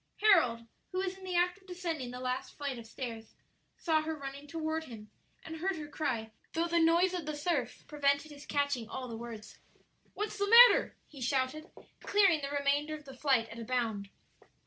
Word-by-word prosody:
Harold, 250 Hz, -, +5 dB, 0.3 s
who 370 Hz, -, -4 dB
was 380 Hz, 0 st, -1 dB
in 385 Hz, -, -14 dB
the 365 Hz, -1 st, -4 dB
act 355 Hz, +2 st, +2 dB
of 380 Hz, -, -25 dB
descending 335 Hz, -8 st, -4 dB
the 250 Hz, +1 st, -7 dB
last 255 Hz, 0 st, -3 dB
flight 280 Hz, -4 st, -3 dB
of 225 Hz, -, -11 dB
stairs, 225 Hz, -2 st, -7 dB, 0.4 s
saw 320 Hz, -2 st, +2 dB
her 315 Hz, +1 st, -3 dB
running 280 Hz, +1 st, -8 dB
toward 320 Hz, +1 st, -3 dB
him, 215 Hz, -5 st, -11 dB, 0.3 s
and 320 Hz, 0 st, -6 dB
heard 375 Hz, +4 st, -1 dB
her 305 Hz, -2 st, -6 dB
cry, 230 Hz, -8 st, -3 dB, 0.2 s
though 330 Hz, +1 st, +1 dB
the 340 Hz, 0 st, +2 dB
noise 340 Hz, +3 st, +4 dB
of 345 Hz, -4 st, -4 dB
the 305 Hz, -, -2 dB
surf 295 Hz, -3 st, -2 dB
prevented 285 Hz, 0 st, 0 dB
his 290 Hz, 0 st, -12 dB
catching 285 Hz, -5 st, -1 dB
all 260 Hz, -1 st, -5 dB
the 230 Hz, -, -6 dB
words. 225 Hz, -2 st, -9 dB, 0.6 s
"What's 420 Hz, 0 st, -3 dB
the 405 Hz, 0 st, +1 dB
matter?" 480 Hz, +2 st, +8 dB
he 280 Hz, -3 st, -12 dB
shouted, 265 Hz, +5 st, -1 dB, 0.3 s
clearing 390 Hz, -7 st, +4 dB
the 275 Hz, -, -3 dB
remainder 285 Hz, +2 st, 0 dB
of 305 Hz, -1 st, -12 dB
the 270 Hz, -, -10 dB
flight 255 Hz, -4 st, +2 dB
at 230 Hz, -, -9 dB
a -, -, -5 dB
bound. 225 Hz, -5 st, -2 dB
290 Hz, 195 wpm, -32 LUFS, 255-335 Hz, 0.6 s, matter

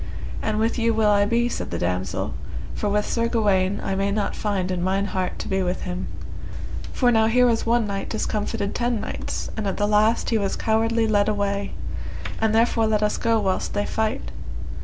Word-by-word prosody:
And 215 Hz, -1 st, 0 dB
with 225 Hz, +2 st, +1 dB
you 230 Hz, -1 st, +2 dB
will 215 Hz, -1 st, +4 dB
I 205 Hz, 0 st, +4 dB
be, 235 Hz, +3 st, +2 dB
said 240 Hz, -, -3 dB
the 85 Hz, -, -2 dB
damosel, 90 Hz, +2 st, -1 dB, 0.4 s
for 210 Hz, -, -1 dB
with 210 Hz, +1 st, +1 dB
Sir 230 Hz, -1 st, 0 dB
Gawaine 200 Hz, -4 st, +2 dB
I 195 Hz, -, -1 dB
may 195 Hz, +1 st, +1 dB
not 205 Hz, 0 st, -1 dB
find 195 Hz, -3 st, -1 dB
in 180 Hz, -1 st, -1 dB
mine 190 Hz, +2 st, +1 dB
heart 185 Hz, -2 st, -2 dB
to -, -, -5 dB
be 190 Hz, 0 st, +1 dB
with 180 Hz, 0 st, -1 dB
him; 180 Hz, 0 st, -3 dB, 0.8 s
for 245 Hz, -2 st, +3 dB
now 220 Hz, -1 st, +4 dB
here 250 Hz, +2 st, +5 dB
was 230 Hz, -1 st, +2 dB
one 235 Hz, -1 st, +3 dB
knight 200 Hz, -1 st, -3 dB
discomfited 215 Hz, -1 st, -1 dB
ten 240 Hz, -2 st, 0 dB
knights, -, -, -4 dB
and 215 Hz, -2 st, -2 dB
at 195 Hz, -, -1 dB
the 205 Hz, -, +2 dB
last 215 Hz, +3 st, +3 dB
he 225 Hz, -, +3 dB
was 195 Hz, -1 st, 0 dB
cowardly 225 Hz, +1 st, +2 dB
led 205 Hz, -1 st, +3 dB
away; 200 Hz, -1 st, -1 dB, 0.7 s
and 220 Hz, -1 st, +2 dB
therefore 225 Hz, 0 st, +3 dB
let 215 Hz, -1 st, +2 dB
us 210 Hz, -, +2 dB
two -, -, -10 dB
go 230 Hz, -1 st, +4 dB
whilst 190 Hz, 0 st, -1 dB
they 205 Hz, 0 st, +1 dB
fight. 220 Hz, +3 st, -1 dB
210 Hz, 205 wpm, -24 LUFS, 200-225 Hz, 0.8 s, here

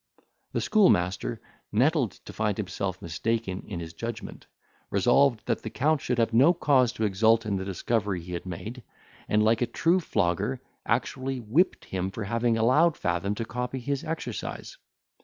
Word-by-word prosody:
The -, -, 0 dB
schoolmaster, 110 Hz, -, +2 dB, 0.3 s
nettled 130 Hz, +2 st, +2 dB
to -, -, -9 dB
find 105 Hz, -2 st, -1 dB
himself 95 Hz, -1 st, -3 dB
mistaken 95 Hz, +3 st, -2 dB
in 90 Hz, -, -5 dB
his 85 Hz, -1 st, -7 dB
judgment, 115 Hz, +5 st, -7 dB, 0.4 s
resolved 120 Hz, +4 st, +3 dB
that -, -, -1 dB
the 110 Hz, -, -5 dB
Count 150 Hz, +5 st, +1 dB
should 125 Hz, -, -1 dB
have 115 Hz, -1 st, +1 dB
no 135 Hz, +9 st, +6 dB
cause 130 Hz, -7 st, +3 dB
to 110 Hz, -, -3 dB
exult 110 Hz, +3 st, +3 dB
in 100 Hz, -2 st, 0 dB
the 95 Hz, -, -4 dB
discovery 100 Hz, 0 st, -1 dB
he 90 Hz, +1 st, -8 dB
had 85 Hz, +2 st, -5 dB
made, 110 Hz, +8 st, -6 dB, 0.5 s
and, 105 Hz, 0 st, +3 dB
like 110 Hz, +2 st, +3 dB
a 120 Hz, -, +2 dB
true 165 Hz, +9 st, +2 dB
flogger, 105 Hz, -, 0 dB, 0.3 s
actually 130 Hz, +2 st, -1 dB
whipped 130 Hz, -, +1 dB
him 95 Hz, 0 st, -2 dB
for 105 Hz, +3 st, -5 dB
having 115 Hz, +2 st, +1 dB
allowed 145 Hz, +9 st, +4 dB
Fathom 90 Hz, +4 st, -1 dB
to 115 Hz, -, -3 dB
copy 125 Hz, +3 st, -4 dB
his 135 Hz, +2 st, -2 dB
exercise. 160 Hz, 0 st, -5 dB
115 Hz, 165 wpm, -27 LUFS, 100-130 Hz, 0.5 s, no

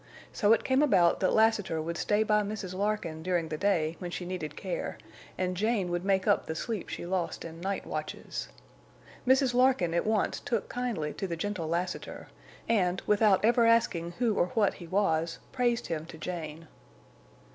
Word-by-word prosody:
So 210 Hz, 0 st, +3 dB
it 225 Hz, -, +4 dB
came 265 Hz, +1 st, +2 dB
about 185 Hz, -, +4 dB
that 185 Hz, -, +2 dB
Lassiter 220 Hz, -7 st, +2 dB
would 165 Hz, +2 st, -3 dB
stay 210 Hz, +4 st, +2 dB
by 210 Hz, -1 st, +3 dB
Mrs. 200 Hz, -3 st, -4 dB
Larkin 190 Hz, -5 st, -2 dB
during 175 Hz, -2 st, -1 dB
the 155 Hz, -, -2 dB
day, 170 Hz, -4 st, +1 dB
when 180 Hz, -, -5 dB
she 180 Hz, +1 st, -5 dB
needed 175 Hz, -4 st, -5 dB
care, -, -, -4 dB, 0.4 s
and 185 Hz, 0 st, -1 dB
Jane 205 Hz, -2 st, 0 dB
would 175 Hz, 0 st, -1 dB
make 195 Hz, -1 st, +2 dB
up 205 Hz, -, +2 dB
the 160 Hz, -, -3 dB
sleep 215 Hz, +2 st, -4 dB
she -, -, -5 dB
lost 180 Hz, -2 st, -2 dB
in 165 Hz, 0 st, -9 dB
night 195 Hz, +2 st, -2 dB
watches. -, -, -5 dB, 0.8 s
Mrs. 260 Hz, -1 st, +4 dB
Larkin 250 Hz, -9 st, +3 dB
at 170 Hz, -, 0 dB
once 215 Hz, -2 st, +1 dB
took 230 Hz, -4 st, -2 dB
kindly 230 Hz, -12 st, -2 dB
to 195 Hz, -, -4 dB
the 170 Hz, -2 st, -4 dB
gentle 195 Hz, -2 st, -3 dB
Lassiter, 175 Hz, +2 st, -3 dB, 0.4 s
and, 190 Hz, -5 st, +2 dB
without 210 Hz, -1 st, +4 dB
ever 235 Hz, 0 st, +4 dB
asking 175 Hz, -7 st, +2 dB
who 235 Hz, 0 st, +1 dB
or 175 Hz, -, +2 dB
what 205 Hz, -4 st, +3 dB
he 175 Hz, -, -10 dB
was, 165 Hz, -3 st, +1 dB
praised 240 Hz, -2 st, +1 dB
him 160 Hz, -1 st, -4 dB
to 160 Hz, -, -10 dB
Jane. 160 Hz, -1 st, -6 dB
190 Hz, 180 wpm, -29 LUFS, 170-220 Hz, 0.8 s, it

